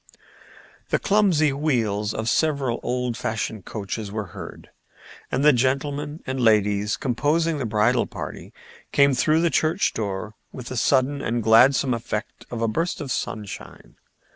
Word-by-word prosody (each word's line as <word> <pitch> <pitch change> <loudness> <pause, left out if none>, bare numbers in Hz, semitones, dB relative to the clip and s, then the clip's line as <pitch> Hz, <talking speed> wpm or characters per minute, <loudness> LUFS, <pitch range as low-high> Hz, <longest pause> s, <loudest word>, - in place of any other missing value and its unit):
The - - +2
clumsy 185 -8 +3
wheels 115 -8 0
of 110 0 -4
several 140 -4 +1
old 125 -1 -2
fashioned 110 -3 -3
coaches 105 0 -5
were 105 0 -3
heard, - - -10 0.6
and 140 - 0
the 150 - +7
gentlemen 140 +4 -1
and 130 -1 -3
ladies 105 -2 +2
composing 150 +5 0
the 125 - -2
bridal 110 +3 +2
party - - -8 0.4
came 140 -1 +4
through 155 +5 +2
the 170 -1 +2
church 165 +5 +1
door 105 0 -4 0.2
with 125 -1 -8
the 130 - -5
sudden 135 +3 +2
and 120 -2 -1
gladsome 125 +4 +5
effect 115 -1 -5
of 115 -1 -3
a - - +2
burst 165 +11 -1
of 145 -4 -5
sunshine. 105 -4 -6
125 Hz, 145 wpm, -23 LUFS, 110-145 Hz, 0.6 s, the